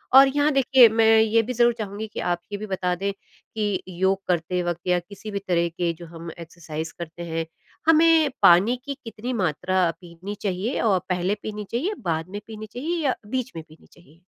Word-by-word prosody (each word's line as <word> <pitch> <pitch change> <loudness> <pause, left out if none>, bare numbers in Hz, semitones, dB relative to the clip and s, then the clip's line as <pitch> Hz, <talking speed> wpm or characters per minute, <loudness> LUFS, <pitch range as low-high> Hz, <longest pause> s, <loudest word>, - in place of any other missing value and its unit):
और 270 0 +10
यहाँ 290 +2 +2
देखिए, 260 -2 +7
मैं 225 0 +5
ये 225 +1 +4
भी 250 +3 -4
ज़रूर 240 0 +4
चाहूँगी 210 0 -5
कि - - -8
आप 175 -1 -1
ये 205 - -3
भी 215 - -6
बता 180 -2 -1
दें 200 +2 -2
कि 205 0 -5
योग 190 +2 0
करते 180 +1 0
वक़्त 175 -1 -3
या 180 0 +3
किसी 205 +4 -10
भी 200 - -2
तरह 170 -1 +2
के 170 0 -1
जो 170 +1 -11
हम 165 0 -9
एक्सरसाज़ 160 -1 -7
करते 170 +1 -7
हैं, 165 -1 -3 0.4
हमें 325 -1 +6
पानी 200 +9 +6
की 280 - -3
कितनी 230 +2 -5
मात्रा 180 +2 +1
पीनी 175 +4 -8
चाहिए, 200 +5 -2
और 200 -5 +3
पहले 180 +3 0
पीनी 210 -1 -5
चाहिए, 320 - -1
बाद 165 +1 -1
में 205 +1 -5
पीनी 215 -1 -8
चाहिए 325 +7 -2
या 260 - +2
बीच 255 +1 -2
में 160 - -6
पीनी 155 - -19
चाहिए? 170 0 -21
195 Hz, 200 wpm, -24 LUFS, 175-230 Hz, 0.4 s, और